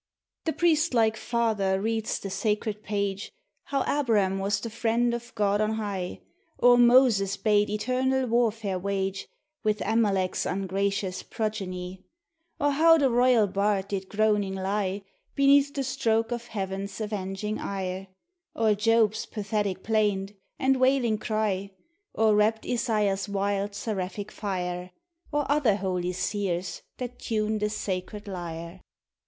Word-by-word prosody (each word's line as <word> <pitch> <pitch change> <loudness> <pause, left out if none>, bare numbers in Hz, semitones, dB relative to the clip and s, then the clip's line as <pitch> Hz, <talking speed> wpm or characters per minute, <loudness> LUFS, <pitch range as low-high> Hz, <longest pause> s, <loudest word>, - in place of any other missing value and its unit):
The 320 - 0
priest 325 -4 +2
like 220 -1 +3
father 220 -5 0
reads 220 +1 -1
the 195 - -6
sacred 210 +1 -1
page, 200 -1 -2 0.2
— - - -50
How 275 -1 -1
A 290 0 0
brum 200 -6 +2
was 200 +1 0
the 230 +2 -6
friend 235 +1 +1
of 235 0 -5
God 205 -1 +2
on 215 +1 +1
high; 200 -5 -4 0.4
Or 245 0 +6
Moses 240 -5 +5
bade 210 -1 +2
eternal 255 +5 0
warfare 225 -5 0
wage 195 0 -2 0.4
With 215 -1 +1
Amalck's 200 -5 +1
ungracious 195 0 -1
progeny; 190 -4 -4 0.6
Or 290 0 +2
how 325 +3 +6
the 275 -4 +2
royal 245 -2 +4
bard 200 0 0
did 195 -2 -3
groaning 210 -2 +1
lie 195 +1 -2 0.3
Beneath 280 0 +5
the 275 -1 -2
stroke 225 -3 0
of 240 0 -4
Heaven's 195 -1 -4
avenging 210 0 -3
ire; 190 -1 -4 0.5
Or 220 -2 +3
Job's 220 0 +2
pathetic 205 -3 -2
plaint, 205 -3 +1 0.2
and 265 0 +2
wailing 255 -4 +3
cry; 205 -3 -1 0.4
Or 220 -1 +4
rapt 215 +1 +2
Isaiah's 210 -5 0
wild, 200 0 -1
seraphic 200 -1 -4
fire; 180 -3 -3 0.4
Or 295 -1 0
other 280 -8 +3
holy 180 -2 -2
seers 185 -1 -2 0.2
that 245 -1 -6
tune 215 -1 -1
the 210 0 0
sacred 205 0 -4
lyre. 170 -1 -6
210 Hz, 135 wpm, -27 LUFS, 195-230 Hz, 0.6 s, Or